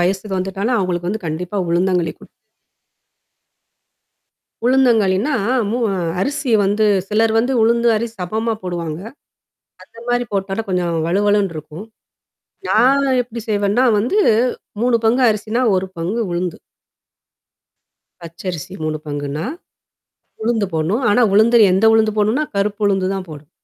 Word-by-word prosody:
வயசுக்கு 190 +3 -1
வந்துட்டாலும் 195 +6 -1
அவங்களுக்கு 175 -2 -2
வந்து 215 -2 -5
கண்டிப்பா 175 +5 -4
உளுந்தங்களி 175 -1 +1
குடுப் - - -16 2.4
உளுந்தங்கழின்னா, 240 -1 +3 0.3
மூ 230 - -1 0.4
அரிசி 285 +3 -2
வந்து 205 +2 +1 0.2
சிலர் 220 +2 +2
வந்து 245 +4 +1
உளுந்து 235 +1 +3
அரிசி 225 +1 -3
சமமா 220 +5 -2
போடுவாங்க. 170 -3 -4 0.8
அந்த - - -18
மாரி 245 0 +1
போட்டழு 195 +2 -2
கொஞ்சம் 175 -3 -1
வழுவழுன்னு 200 0 +1
இருக்கும். 155 +5 -9 0.9
நான் 270 +5 +4 0.2
எப்படி 235 -1 -8
செய்வேன்னா 205 +3 +1 0.2
வந்து 245 - 0 0.6
3 245 0 +3
பங்கு 245 +4 +3
அரிசினா, 215 +3 -2
1 185 +1 -1
பங்கு 185 +8 -2
உளுந்து. 175 0 -3 1.6
பச்சரிசி 170 +1 -7
3 155 0 -2
பங்குன்னா. 145 +2 -4 1.0
உளுந்து 220 -2 0
போடணும். 170 +11 0
ஆனா, 245 - +3
உளுந்து 230 +3 +5
எந்த 190 +4 +2
உளுந்து 220 -1 +3
போடணுனா? 220 +8 +1
கருப்பு 205 +2 -1
உளுந்து 195 -2 +1
தான் 190 -1 -5
போடணும். 150 -1 -11
200 Hz, 120 wpm, -18 LUFS, 180-230 Hz, 2.4 s, உளுந்து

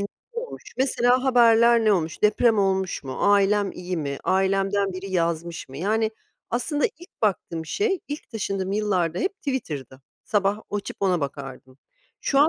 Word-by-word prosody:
ne 200 - -1 0.3
olmuş? 475 +1 -6 0.2
Mesela 255 -1 +3
haberler 235 -2 +5
ne 215 - +5
olmuş? 165 -4 -1
Deprem 215 +1 +4
olmuş 190 -4 0
mu? 130 -1 -5 0.2
Ailem 200 0 +3
iyi 180 0 -4
mi? 140 -3 -3
Ailemden 195 +1 +1
biri 190 +1 -6
yazmış 170 -1 -1
mı? 135 - -10
Yani 215 +7 +1 0.4
aslında 285 +5 0
ilk 345 -4 -15
baktığım 170 -6 -1
şey, 395 - 0
ilk 290 +1 -6
taşındığım 195 -4 -2
yıllarda 185 -5 0
hep 390 +1 -1
Twitter'dı. 150 - -4 0.2
Sabah 205 0 +1
açıp 205 -1 -4
ona 185 -4 +2
bakardım. 135 -2 -7 0.4
Şu 275 - +1
an 295 +2 +6
200 Hz, 155 wpm, -24 LUFS, 175-235 Hz, 0.4 s, an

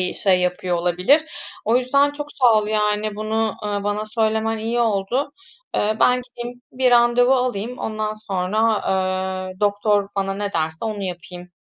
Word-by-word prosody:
bir 180 - -2
şey 185 -2 +2
yapıyor 180 0 -1
olabilir. 180 - +2 0.4
O 225 +3 +3
yüzden 280 +3 +3
çok 295 0 -7
sağ 245 -4 +4
ol, 210 - -2
yani, 210 0 0
bunu, 220 0 -1
ııı, 205 -1 -2
bana 210 +1 -1
söylemen 220 0 0
iyi 230 +2 -1
oldu. 230 +6 0 0.4
Eee, 215 +1 +1
ben 250 0 +4
gideyim 245 0 -9
bir 255 0 +2
randevu 240 +1 +5
alayım, 250 -1 -2
ondan 215 -1 -3
sonra, 215 +1 0 0.7
eee, 185 +2 -13
doktor 205 0 +1
bana 195 0 -1
ne 205 0 -3
derse 160 +5 -2
onu 215 -2 -3
yapayım. 180 -1 -7
215 Hz, 160 wpm, -21 LUFS, 200-240 Hz, 0.7 s, randevu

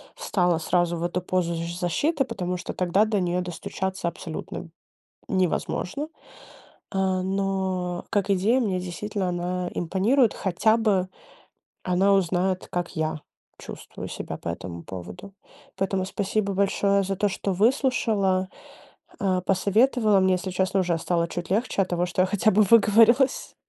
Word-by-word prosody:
встала 180 - +1
сразу 175 +1 +1
в 165 - -4
эту 175 +1 -1
позу 180 -1 -1
з 170 +1 -4
защиты, 270 - +1
потому 180 -6 -3
что - - -6
тогда 185 +3 +2
до 215 -2 0
неё 180 0 0
достучаться 185 +1 -4
абсолютно 170 0 -6 0.6
невозможно. 185 - -1 0.8
А, 190 -1 0
но 190 -2 -2
как 205 -1 0
идея 200 +6 +3
мне 190 -6 0
действительно 185 +2 -3
она 180 0 -2
импонирует. 210 +8 +2
Хотя 200 +4 +2
бы 200 -5 +1 0.8
она 185 +2 +3
узнает, 185 0 +1
как 175 +1 -3
я 155 -1 -2 0.4
чувствую - - -9
себя - - -6
по 85 - -6
этому 85 0 -6
поводу. 90 - -9 0.4
Поэтому 195 -1 0
спасибо 200 +1 -1
большое 200 0 +2
за 195 0 -2
то, 205 +2 +1
что 195 0 -2
выслушала, 205 -4 +1 0.7
а, 185 -2 +1
посоветовала 210 +3 +3
мне, 190 0 +3
если 180 +1 -3
честно, 190 +1 +1
уже 175 -2 +1
стало 170 0 0
чуть 175 0 -6
легче 205 0 +1
от 185 - -3
того, 175 0 0
что 185 +1 +1
я - - +2
хотя 205 +2 +2
бы 215 +3 +5
выговорилась. 230 +5 +4
185 Hz, 145 wpm, -25 LUFS, 180-200 Hz, 0.8 s, бы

